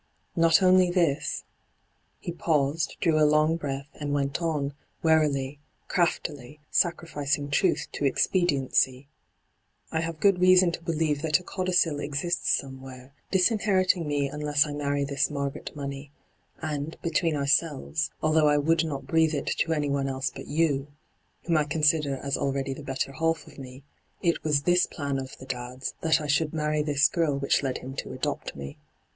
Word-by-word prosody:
hyGoogIc 165 Hz, -, 0 dB
n2 -, -, +5 dB
ENTRAPPED 165 Hz, +3 st, +5 dB
Not -, -, +5 dB
only 185 Hz, -1 st, +5 dB
this 170 Hz, -6 st, 0 dB, 0.2 s
' -, -, -44 dB
— -, -, -43 dB
he -, -, -2 dB
paused, 155 Hz, -2 st, 0 dB
drew 160 Hz, -3 st, +3 dB
a -, -, +5 dB
long 155 Hz, +2 st, +4 dB
breath, 140 Hz, -4 st, -4 dB
and 145 Hz, -1 st, -5 dB
went 140 Hz, +3 st, -1 dB
on, 150 Hz, -4 st, -1 dB, 0.3 s
warily, 145 Hz, -4 st, +2 dB, 0.3 s
craftily, 150 Hz, -6 st, -1 dB
sacrificing 145 Hz, -4 st, 0 dB
troth -, -, +2 dB
to 145 Hz, -, -3 dB
expediency 135 Hz, -4 st, +1 dB, 0.3 s
— -, -, -46 dB
' -, -, -35 dB
I 160 Hz, -, 0 dB
have 165 Hz, -1 st, -4 dB
good 195 Hz, -2 st, +3 dB
reason 185 Hz, -1 st, +6 dB
to 170 Hz, -, -6 dB
believe 160 Hz, -3 st, -1 dB
that 160 Hz, 0 st, +2 dB
a -, -, -14 dB
codicil 180 Hz, -5 st, 0 dB
exists 150 Hz, +5 st, -2 dB
somewhere, 130 Hz, -1 st, -3 dB, 0.2 s
dis 190 Hz, +4 st, +3 dB
inheriting 185 Hz, -6 st, +1 dB
me 145 Hz, -1 st, 0 dB
unless 150 Hz, 0 st, +1 dB
I 150 Hz, -, -5 dB
marry 145 Hz, -1 st, -1 dB
this 140 Hz, 0 st, 0 dB
Margaret 140 Hz, 0 st, -4 dB
Money; 140 Hz, 0 st, -6 dB, 0.5 s
and, 150 Hz, 0 st, -4 dB
between 165 Hz, -1 st, +1 dB
ourselves, 145 Hz, +1 st, 0 dB
although 155 Hz, 0 st, +4 dB
I 150 Hz, 0 st, +4 dB
would 160 Hz, +3 st, +2 dB
not 140 Hz, -4 st, -4 dB
breathe 160 Hz, +2 st, +2 dB
it 140 Hz, -, -2 dB
to 165 Hz, -, +1 dB
anyone 140 Hz, -3 st, 0 dB
else 135 Hz, 0 st, -2 dB
but -, -, -9 dB
you, 145 Hz, -2 st, +1 dB, 0.6 s
whom 170 Hz, -2 st, +1 dB
I 150 Hz, -, +2 dB
consider 150 Hz, -2 st, +2 dB
as 140 Hz, +1 st, -2 dB
already 135 Hz, -1 st, -1 dB
the 140 Hz, -, -9 dB
better 135 Hz, -1 st, -3 dB
half 165 Hz, +3 st, -1 dB
of -, -, -14 dB
me, 130 Hz, 0 st, -10 dB, 0.4 s
it 170 Hz, -2 st, +1 dB
was 150 Hz, -2 st, +1 dB
this 180 Hz, +2 st, +3 dB
plan 140 Hz, -3 st, -3 dB
of 130 Hz, 0 st, -8 dB
the 130 Hz, -, -11 dB
dad's 125 Hz, 0 st, -5 dB
that 160 Hz, 0 st, +3 dB
I 150 Hz, -, -5 dB
should 150 Hz, +2 st, +1 dB
marry 150 Hz, -1 st, 0 dB
this 145 Hz, -1 st, +3 dB
girl 160 Hz, -5 st, 0 dB
which 140 Hz, 0 st, +1 dB
led 135 Hz, -2 st, -2 dB
him 135 Hz, +1 st, -8 dB
to -, -, -5 dB
adopt -, -, -3 dB
me. 70 Hz, 0 st, -8 dB
150 Hz, 180 wpm, -27 LUFS, 140-165 Hz, 0.6 s, reason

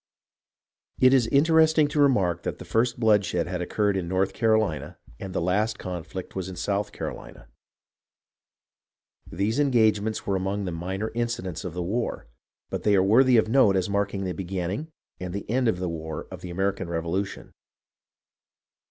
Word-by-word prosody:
It 130 Hz, +1 st, +6 dB
is 125 Hz, -4 st, +4 dB
interesting 160 Hz, +2 st, +4 dB
to 150 Hz, 0 st, +1 dB
remark 95 Hz, -11 st, +3 dB
that -, -, -4 dB
the -, -, -10 dB
first 120 Hz, +2 st, 0 dB
bloodshed 105 Hz, -6 st, +2 dB
had 90 Hz, 0 st, -4 dB
occurred 100 Hz, +3 st, 0 dB
in 90 Hz, -3 st, -2 dB
North 95 Hz, +2 st, 0 dB
Carolina 110 Hz, -, 0 dB, 0.2 s
and 95 Hz, -, -6 dB
the 90 Hz, -, -1 dB
last 105 Hz, +5 st, 0 dB
conflict 90 Hz, 0 st, -6 dB
was 95 Hz, -1 st, -3 dB
in 95 Hz, -, -7 dB
South 100 Hz, +3 st, -2 dB
Carolina. -, -, -8 dB, 1.8 s
These 105 Hz, +9 st, -1 dB
engagements 110 Hz, -6 st, +2 dB
were 100 Hz, -, 0 dB
among 95 Hz, +2 st, -2 dB
the 90 Hz, -, -3 dB
minor 95 Hz, +6 st, -4 dB
incidents 115 Hz, -7 st, -3 dB
of 90 Hz, -3 st, -6 dB
the 90 Hz, -, -2 dB
war, 115 Hz, +7 st, -2 dB, 0.5 s
but -, -, -3 dB
they 105 Hz, -1 st, +3 dB
are 95 Hz, -, +4 dB
worthy 120 Hz, +5 st, +5 dB
of 110 Hz, -, +3 dB
note 110 Hz, -4 st, +4 dB
as 95 Hz, +1 st, 0 dB
marking 100 Hz, -1 st, -1 dB
the 90 Hz, -1 st, -2 dB
beginning 95 Hz, -, -3 dB, 0.3 s
and 90 Hz, 0 st, -5 dB
the 100 Hz, -, -5 dB
end 125 Hz, +3 st, +1 dB
of 110 Hz, -, +1 dB
the 90 Hz, 0 st, -3 dB
war 80 Hz, -2 st, -5 dB
of -, -, -8 dB
the 90 Hz, -, -7 dB
American 95 Hz, 0 st, -2 dB
Revolution. 85 Hz, +4 st, -3 dB
100 Hz, 165 wpm, -26 LUFS, 90-115 Hz, 1.8 s, It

